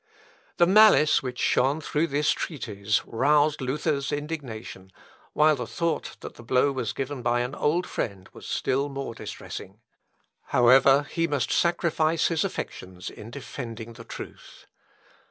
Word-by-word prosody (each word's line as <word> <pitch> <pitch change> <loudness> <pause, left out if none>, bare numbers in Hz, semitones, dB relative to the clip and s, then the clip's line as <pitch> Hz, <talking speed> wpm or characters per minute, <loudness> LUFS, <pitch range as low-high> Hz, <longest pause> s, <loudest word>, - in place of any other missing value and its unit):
The 175 - +6
malice 190 -5 +6
which 125 -2 -5
shone 135 +6 +2
through 155 +1 -1
this 145 +1 +1
treatise 110 - -2
roused 145 +5 +2
Luther's 140 +1 -1
indignation, 135 -11 -6 0.4
while 155 0 +4
the 125 -4 -5
thought 170 +5 -2
that - - -8
the - - -13
blow 130 +4 +2
was 130 - -2
given 135 -1 -4
by 120 0 +1
an 125 +2 -3
old 170 +6 0
friend, 100 - -4
was - - -11
still 140 +2 0
more 135 -3 -5
distressing. 105 -2 -8 0.7
However, 135 +3 +5
he 165 +2 -1
must 145 -5 -1
sacrifice 165 -2 +1
his 165 -3 +1
affections 90 -1 -6
in 105 - -11
defending 115 -3 -7
the 115 0 -11
truth. - - -10
135 Hz, 140 wpm, -26 LUFS, 120-155 Hz, 0.7 s, The